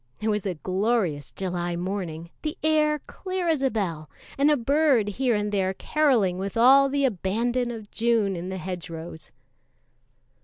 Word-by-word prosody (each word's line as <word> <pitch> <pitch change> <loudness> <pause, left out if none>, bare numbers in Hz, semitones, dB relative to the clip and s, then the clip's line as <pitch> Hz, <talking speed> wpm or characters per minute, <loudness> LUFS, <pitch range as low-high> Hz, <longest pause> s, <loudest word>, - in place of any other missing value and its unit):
It 215 +1 -1
was 210 -2 -1
a 185 - -2
glorious 185 - -1
July 175 -2 -3
morning, 175 -2 -4
the 310 +3 -4
air 305 -1 +3
clear 370 -2 -4
as 315 -4 +1
a 270 - +3
bell, 170 - -3 0.3
and 280 +2 +3
a 300 - +4
bird 275 -3 +3
here 245 +3 +1
and 210 0 -1
there 190 -2 0
carolling 235 -14 +2
with 195 +3 -4
all 270 +4 +6
the 280 0 +1
abandon 235 +3 0
of 220 -3 -8
June 225 -4 +1
in 175 +2 -5
the 190 - -4
hedgerows. 170 -2 -7
210 Hz, 160 wpm, -25 LUFS, 185-270 Hz, 0.3 s, all